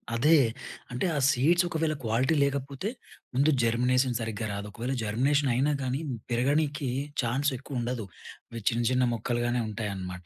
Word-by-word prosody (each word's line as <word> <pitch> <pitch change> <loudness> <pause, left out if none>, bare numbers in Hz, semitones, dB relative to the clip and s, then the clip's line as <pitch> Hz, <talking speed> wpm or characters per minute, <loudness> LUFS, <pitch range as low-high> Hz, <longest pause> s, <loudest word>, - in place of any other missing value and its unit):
అదే. 150 +7 +5 0.6
అంటే 125 +8 -1
ఆ - - 0
సీడ్స్ 170 +8 +3
ఒకవేళ 160 -1 0
క్వాలిటీ 125 +8 +2
లేకపోతే, 140 +6 -2 0.4
ముందు 140 +4 +3
జర్మినేసన్ 125 +2 +2
సరిగ్గా 110 -1 -3
రాదు. 100 +1 -5
ఒకవేళ 120 +5 -3
జర్మినేషన్ 135 +6 +2
అయినా 135 +5 +2
గానీ, 130 +2 -1 0.3
పెరగనీకి 140 +3 +1 0.3
ఛాన్స్ 135 +5 +1
ఎక్కువ 135 -1 -5
ఉండదు. 120 -3 -3 0.5
అవి 115 -1 -6
చిన్న, 120 0 -1
చిన్న 125 0 +3
మొక్కలుగానే 120 +1 -1
ఉంటాయన్నమాట. 95 -5 -5
125 Hz, 140 wpm, -28 LUFS, 115-140 Hz, 0.6 s, అదే